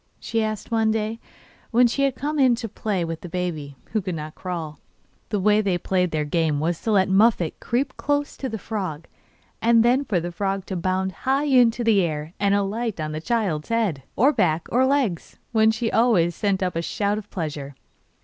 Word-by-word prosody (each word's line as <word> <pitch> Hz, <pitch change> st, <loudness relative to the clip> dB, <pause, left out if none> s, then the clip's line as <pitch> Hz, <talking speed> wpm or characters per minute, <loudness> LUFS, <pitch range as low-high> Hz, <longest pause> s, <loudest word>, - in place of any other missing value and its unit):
she 225 Hz, -1 st, -1 dB
asked 215 Hz, +1 st, -4 dB
one 225 Hz, -1 st, +2 dB
day, 220 Hz, +1 st, -1 dB, 0.5 s
when 245 Hz, +1 st, +5 dB
she 240 Hz, +4 st, 0 dB
had 270 Hz, -2 st, 0 dB
come 295 Hz, +2 st, -2 dB
in 255 Hz, -3 st, +5 dB
to 230 Hz, -1 st, -5 dB
play 195 Hz, -4 st, -2 dB
with 165 Hz, -1 st, -5 dB
the 175 Hz, -, -8 dB
baby, 165 Hz, -5 st, -4 dB, 0.2 s
who 215 Hz, -, 0 dB
could 185 Hz, -2 st, -4 dB
now 155 Hz, 0 st, -6 dB
crawl. 160 Hz, -4 st, -6 dB, 0.5 s
The 210 Hz, -, 0 dB
way 210 Hz, +2 st, +4 dB
they 195 Hz, -4 st, 0 dB
played 180 Hz, 0 st, 0 dB
their 155 Hz, -2 st, -1 dB
game 155 Hz, -1 st, 0 dB
was 165 Hz, +2 st, -1 dB
to 225 Hz, -, -1 dB
let 190 Hz, -2 st, +4 dB
Muffette 195 Hz, -3 st, +3 dB
creep 245 Hz, +4 st, -1 dB
close 290 Hz, 0 st, -1 dB
to 265 Hz, -, -4 dB
the 220 Hz, -, -4 dB
frog, 185 Hz, -7 st, -4 dB, 0.6 s
and 230 Hz, 0 st, +4 dB
then 255 Hz, +4 st, +3 dB
for 200 Hz, -10 st, 0 dB
the 175 Hz, +1 st, -4 dB
frog 195 Hz, +2 st, -2 dB
to 190 Hz, -, -4 dB
bound 185 Hz, +2 st, -1 dB
high 265 Hz, -, 0 dB
into 245 Hz, -4 st, +4 dB
the 220 Hz, -4 st, +4 dB
air 155 Hz, -1 st, -3 dB
and 200 Hz, 0 st, +3 dB
alight 205 Hz, +1 st, -1 dB
on 155 Hz, 0 st, -3 dB
the 155 Hz, 0 st, -4 dB
child's 190 Hz, -8 st, -1 dB
head, 220 Hz, -11 st, 0 dB
or 275 Hz, +6 st, +4 dB
back, 170 Hz, -, +1 dB
or 255 Hz, +3 st, +3 dB
legs, 260 Hz, -, -1 dB
when 220 Hz, -2 st, +4 dB
she 225 Hz, +1 st, -1 dB
always 215 Hz, -8 st, +3 dB
sent 195 Hz, +1 st, 0 dB
up 180 Hz, -2 st, -2 dB
a 165 Hz, -, 0 dB
shout 205 Hz, +4 st, -1 dB
of 210 Hz, 0 st, -12 dB
pleasure. 150 Hz, -5 st, -5 dB
200 Hz, 205 wpm, -23 LUFS, 170-230 Hz, 0.6 s, when